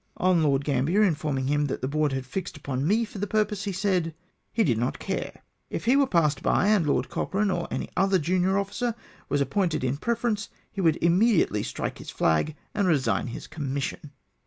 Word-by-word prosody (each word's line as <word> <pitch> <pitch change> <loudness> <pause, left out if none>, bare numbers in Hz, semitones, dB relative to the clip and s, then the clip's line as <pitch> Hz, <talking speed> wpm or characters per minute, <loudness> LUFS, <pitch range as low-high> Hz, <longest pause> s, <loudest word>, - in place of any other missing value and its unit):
On 180 -2 +3
Lord 140 -2 +2
Gambler 150 +9 +2
informing 150 -7 0
him 145 +2 +1
that 140 - -3
the 130 - -1
Board 150 +1 +1
had 135 -1 -3
fixed 180 +4 -5
upon 140 -1 -2
me 220 +5 +3
for 215 -2 -9
the 205 - -1
purpose, 210 -1 0
he 200 - -1
said, 185 -4 0 0.2
" - - -47
he 230 - +2
did 120 - +1
not 120 +2 -1
care; - - -4 0.3
if 165 - -4
he 245 +3 +4
were 280 -1 +4
passed 155 - +2
by, 200 - +2
and 200 -7 +3
Lord 145 - +1
Cochrane 200 +1 -1
or 175 -2 -2
any - - -3
other 195 0 +3
junior 185 +3 +1
officer 225 +4 -1 0.3
was 145 - +1
appointed 155 +1 0
in 130 +2 0
preference, 230 +2 -1 0.2
he 200 - -3
would 165 -3 +3
immediately 175 - +3
strike - - -4
his - - -8
flag, 80 - +1 0.2
and 200 -2 +1
resign 145 -5 +1
his 120 - -7
commission 140 -1 -4
170 Hz, 205 wpm, -26 LUFS, 140-200 Hz, 0.3 s, he